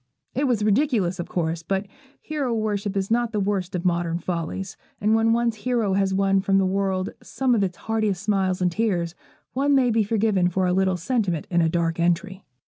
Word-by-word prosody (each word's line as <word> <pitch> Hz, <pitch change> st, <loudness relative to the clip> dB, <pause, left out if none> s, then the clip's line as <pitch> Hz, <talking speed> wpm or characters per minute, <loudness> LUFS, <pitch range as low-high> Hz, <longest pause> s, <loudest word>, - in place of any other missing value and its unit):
It 275 Hz, +3 st, 0 dB
was 230 Hz, -5 st, +1 dB
ridiculous, 210 Hz, -, +1 dB
of 175 Hz, -, -4 dB
course; 165 Hz, -1 st, -1 dB
but 190 Hz, +4 st, -2 dB, 0.4 s
hero 280 Hz, -6 st, -2 dB
worship 205 Hz, -2 st, -1 dB
is 195 Hz, +2 st, -2 dB
not 235 Hz, 0 st, +1 dB
the 210 Hz, -, 0 dB
worst 195 Hz, -2 st, -1 dB
of 180 Hz, +1 st, -3 dB
modern 170 Hz, -1 st, +1 dB
follies, 175 Hz, +2 st, -4 dB, 0.2 s
and 210 Hz, +2 st, +2 dB
when 225 Hz, 0 st, +3 dB
one's 235 Hz, -1 st, +1 dB
hero 225 Hz, -3 st, 0 dB
has 195 Hz, 0 st, +1 dB
won 195 Hz, 0 st, +2 dB
from 195 Hz, 0 st, +2 dB
the 195 Hz, -, +3 dB
world 190 Hz, 0 st, 0 dB
some 260 Hz, -2 st, 0 dB
of 225 Hz, -, +2 dB
its 180 Hz, -2 st, -2 dB
heartiest 215 Hz, -4 st, -1 dB
smiles 190 Hz, -3 st, +1 dB
and 180 Hz, -, +2 dB
tears, 175 Hz, -4 st, 0 dB, 0.4 s
one 280 Hz, +2 st, +2 dB
may 255 Hz, -3 st, +3 dB
be 225 Hz, 0 st, +3 dB
forgiven 205 Hz, -4 st, +2 dB
for 185 Hz, +1 st, 0 dB
a 180 Hz, -, +2 dB
little 190 Hz, -1 st, +2 dB
sentiment 180 Hz, -, -1 dB
in 175 Hz, -1 st, +3 dB
a 165 Hz, -, +2 dB
dark 165 Hz, 0 st, 0 dB
entry. 185 Hz, +3 st, 0 dB
195 Hz, 205 wpm, -24 LUFS, 180-225 Hz, 0.4 s, when